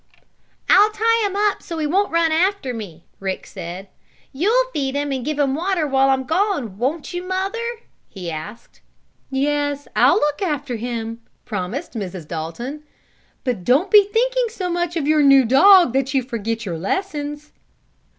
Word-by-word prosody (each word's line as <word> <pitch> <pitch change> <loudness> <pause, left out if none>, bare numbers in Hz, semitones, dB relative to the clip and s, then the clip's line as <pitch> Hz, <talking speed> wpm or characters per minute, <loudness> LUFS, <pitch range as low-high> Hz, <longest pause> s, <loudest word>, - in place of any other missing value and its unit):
"I'll 420 +1 +6
tie 455 +2 +1
him 395 - -6
up 410 0 +1
so 335 - -6
he 310 - -1
won't 385 +7 +1
run 335 -1 +2
after 345 -4 +1
me," 185 -8 -8
Rick 190 -1 -4
said. 180 +1 -8 0.5
"You'll 460 - +1
feed 275 -2 -2
him 285 0 -1
and 260 -2 -2
give 300 +2 -3
him 280 -2 +1
water 345 +2 0
while 270 -1 +3
I'm 265 -1 +2
gone; 300 - -1
won't 290 +8 -2
you, 355 - -3
Mother?" 380 +5 -3 0.5
he 180 -4 -6
asked. 180 +9 -9 0.5
"Yes, 285 +1 -1
I'll - - +5
look 295 -3 0
after 295 -8 -2
him," 230 0 -5 0.2
promised 210 - -4
Mrs. 185 -7 -6
Dalton. 170 - -5 0.6
"But 245 -9 -2
don't 285 - +2
be 420 -1 +8
thinking - - +1
so 370 -5 -4
much 345 0 -1
of 300 -4 -1
your 305 0 +4
new 275 -2 +6
dog 345 - +6
that 270 +1 0
you 265 - +2
forget 230 -2 -4
your 170 -4 -4
lessons." 295 - -3
285 Hz, 165 wpm, -21 LUFS, 235-355 Hz, 0.6 s, be